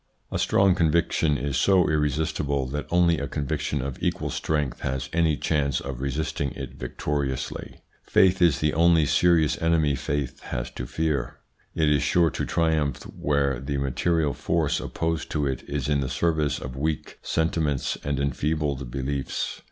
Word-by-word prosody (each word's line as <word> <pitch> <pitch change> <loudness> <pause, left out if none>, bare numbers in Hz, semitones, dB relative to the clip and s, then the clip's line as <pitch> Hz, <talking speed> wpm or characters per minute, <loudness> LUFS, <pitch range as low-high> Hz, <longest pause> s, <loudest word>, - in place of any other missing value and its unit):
A - - -1
strong 95 -1 +4
conviction 80 -3 +2
is 70 +2 -2
so 95 -2 +4
irresistible 75 -2 0
that 75 +2 -4
only 85 -1 +3
a 70 - -3
conviction 70 -1 -2
of 65 -2 -5
equal - - -1
strength 75 -5 -1
has 65 -1 -3
any 80 -3 +2
chance 70 -4 0
of 65 -1 -6
resisting 70 0 -2
it 65 -2 -7
victoriously. 65 -1 -4 0.2
Faith 95 -1 +3
is 80 -6 +4
the 75 0 +2
only 85 -1 +4
serious 85 -1 +3
enemy 80 -3 +3
faith 70 -1 -3
has - - -5
to 60 - -6
fear. 75 -4 -1 0.4
It 80 - +2
is 75 -2 +3
sure 85 +3 +3
to - - -2
triumph 80 -3 0
where 70 -3 +1
the 70 +1 -3
material 75 +3 +1
force 80 -3 0
opposed 80 -1 -2
to 75 -2 0
it 65 -2 -2
is 70 -2 -2
in 75 -1 +2
the 65 -2 -2
service 80 -2 +1
of 65 +1 -7
weak 75 +2 -3
sentiments 80 -4 0
and 70 -1 -1
enfeebled 70 -1 -1
beliefs. 70 +1 -3
75 Hz, 160 wpm, -25 LUFS, 70-80 Hz, 0.4 s, strong